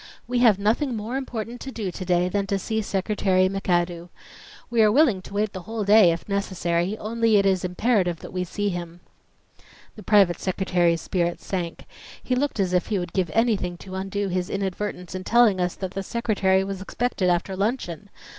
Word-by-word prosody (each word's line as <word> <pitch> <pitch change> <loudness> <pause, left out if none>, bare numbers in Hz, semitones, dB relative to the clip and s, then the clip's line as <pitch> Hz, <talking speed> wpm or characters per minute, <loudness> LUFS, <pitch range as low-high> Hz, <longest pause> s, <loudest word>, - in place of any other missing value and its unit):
"We 245 0 0
have 225 -5 +5
nothing 230 +6 0
more 220 +4 -4
important 245 -3 -5
to 270 - -6
do 210 -7 -4
to 185 +1 -7
day 180 0 +2
than 200 +2 -1
to 200 - 0
see 220 +3 -2
Secretary 190 -2 +1
McAdoo. 175 -2 -1 0.6
We 235 -1 +2
are 215 -1 +5
willing 245 -7 +4
to 195 - -12
wait 210 0 0
the 185 - -6
whole 225 -1 -2
day, 205 -3 +6
if 165 - -5
necessary, 185 -1 -1
only 225 0 +1
it 200 - +3
is 190 -2 +2
imperative 180 -1 +1
that - - -10
we 180 0 -1
see 205 +3 -2
him." 175 -1 -6 0.9
The 215 - -10
private 200 -5 +4
secretary's 175 -3 +1
spirits 175 -2 -2
sank. 175 -3 -4 0.4
He 255 - -1
looked 265 -2 -1
as 185 -2 +1
if 180 - +1
he 210 - 0
would 175 -1 -4
give 185 -3 0
anything 210 -6 +1
to 185 +1 -11
undo 195 +1 -2
his 180 0 -2
inadvertence 195 -2 -4
in 185 0 -5
telling 230 -3 +4
us 180 0 -1
that 190 -2 -5
the 195 - -4
Secretary 195 -3 +1
was 195 -1 -5
expected 195 -2 -1
after 180 +2 0
luncheon! 200 -3 -2
195 Hz, 195 wpm, -24 LUFS, 180-215 Hz, 0.9 s, day